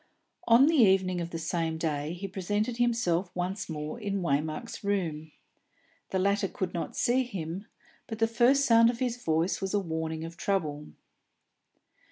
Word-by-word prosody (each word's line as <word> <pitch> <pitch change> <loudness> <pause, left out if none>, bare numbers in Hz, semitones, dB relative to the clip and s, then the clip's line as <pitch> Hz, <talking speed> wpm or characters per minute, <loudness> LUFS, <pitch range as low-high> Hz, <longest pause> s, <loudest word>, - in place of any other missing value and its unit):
On 235 +4 +7
the 320 +1 +3
evening 190 -6 +4
of 170 - -4
the 170 - -5
same 165 0 -2
day 155 -1 -2
he 185 +3 -5
presented 205 +5 -2
himself 225 -7 +1
once 180 +3 -3
more 155 +5 -5
in 200 -3 -2
Waymark's 155 +3 -2
room. 165 -6 -2 0.8
The 190 - -1
latter 200 +1 +1
could 185 -1 -4
not 170 - -4
see 250 +2 +2
him, 190 -5 -5 0.4
but 225 - -5
the 225 - +3
first 245 +5 +3
sound 230 -1 +6
of 235 - -2
his 245 -1 -2
voice 165 +3 0
was 195 +1 -1
a - - +3
warning 160 -3 -3
of 165 +1 -8
trouble. 150 -7 -1
190 Hz, 165 wpm, -29 LUFS, 160-225 Hz, 0.8 s, On